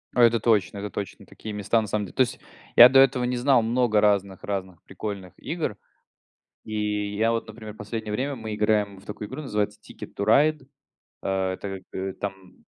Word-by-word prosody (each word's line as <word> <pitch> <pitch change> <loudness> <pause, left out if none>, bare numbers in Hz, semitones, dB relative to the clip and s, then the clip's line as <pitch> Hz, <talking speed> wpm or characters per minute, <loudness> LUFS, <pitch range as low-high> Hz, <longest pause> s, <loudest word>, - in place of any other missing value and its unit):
А, 120 - +5
это 115 0 +5
точно, 105 -3 +2
это 105 - -4
точно 100 -2 -6
такие 110 - -9
места 105 +2 +1
на 110 - -3
самом 105 0 -1
дел - - -12
то - - +1
есть 125 - +1 0.4
я 120 +1 +11
до 135 0 +6
этого 135 -2 +4
не 125 0 -1
знал 125 -1 +4
много 115 -2 +2
разных 100 -2 +1
разных 95 -3 -4
прикольных 100 -4 -6
игр, 160 -11 -3 0.9
и 105 -1 -2
я 115 +2 +2
вот, 115 -1 -2
например, 110 -1 -9
в - - -18
последнее 105 +1 -5
время 135 +5 -2
мы 110 -2 -5
играем 105 -2 +1
в 100 - -19
такую 105 0 -6
игру, 135 +4 -6
называется 105 -4 -2
Ticket - - -11
to 100 - -2
Ride, 145 +5 +3 0.6
э, 95 -1 -1
так 95 -2 -6
как 95 0 -5
там 95 -2 -7
105 Hz, 195 wpm, -25 LUFS, 100-120 Hz, 0.9 s, я